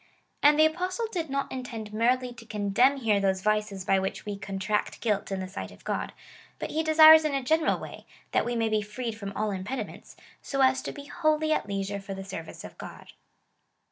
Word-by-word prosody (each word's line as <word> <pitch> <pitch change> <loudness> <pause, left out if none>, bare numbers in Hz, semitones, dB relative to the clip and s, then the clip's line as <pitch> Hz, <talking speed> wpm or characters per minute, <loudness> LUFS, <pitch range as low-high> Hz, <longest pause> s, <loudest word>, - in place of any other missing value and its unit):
^ - - -30 0.4
And 295 +1 +6
the 310 - +7
Apostle 365 +8 -1
did 330 -6 -3
not 275 0 -2
intend 235 -5 -6
merely 245 +3 +1
to 235 -1 -13
condemn 215 +6 +2
here 220 -6 +2
those 190 -1 0
vices 210 -3 0
by 195 -2 +3
which 190 0 -4
we 205 -1 -3
contract 200 +1 -2
guilt 210 -3 -1
in 190 -1 -2
the 185 - -4
sight 185 - -6
of - - -16
God, - - -2 0.5
but - - -5
he 315 - 0
desires 315 0 +8
in 300 -2 0
a 270 - -1
general 315 +4 +2
way, - - -10 0.2
that - - +2
we 240 0 -2
may 225 -1 +1
be 215 -1 +1
freed 220 +2 -5
from 200 -2 -6
all 215 +1 -1
impediments, 195 +7 -6 0.3
so 275 -1 -2
as 260 0 +3
to - - -5
be 285 -1 -10
wholly 310 0 +1
at - - -1
leisure 200 0 -3
for 195 0 -7
the 195 - -6
service 165 -4 -8
of - - -11
God. - - -10
225 Hz, 215 wpm, -27 LUFS, 200-285 Hz, 0.5 s, desires